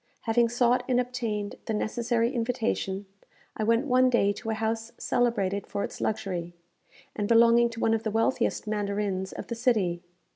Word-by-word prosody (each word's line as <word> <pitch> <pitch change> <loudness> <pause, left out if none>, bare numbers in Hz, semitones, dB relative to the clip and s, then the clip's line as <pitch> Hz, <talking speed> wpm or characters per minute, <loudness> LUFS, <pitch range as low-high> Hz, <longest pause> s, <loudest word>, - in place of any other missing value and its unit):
Having 230 +1 +2
sought 245 +1 +2
and 250 -1 +3
obtained 230 -5 -3
the 220 - -1
necessary 235 +2 0
invitation, 225 -5 -1 0.5
I 220 - -2
went 230 +4 +2
one 255 -1 +4
day 205 -5 +3
to 225 +3 -7
a 220 - 0
house 225 +1 -2
celebrated 205 -5 0
for 200 - -3
its - - -6
luxury, 180 -5 -3 0.6
and 205 - -1
belonging 235 +1 +5
to 230 0 -8
one 225 - +2
of 225 - +1
the 220 - -2
wealthiest 225 +3 0
mandarins 200 -2 -2
of - - -7
the - - -5
city. 210 -8 +1
225 Hz, 170 wpm, -27 LUFS, 205-235 Hz, 0.6 s, belonging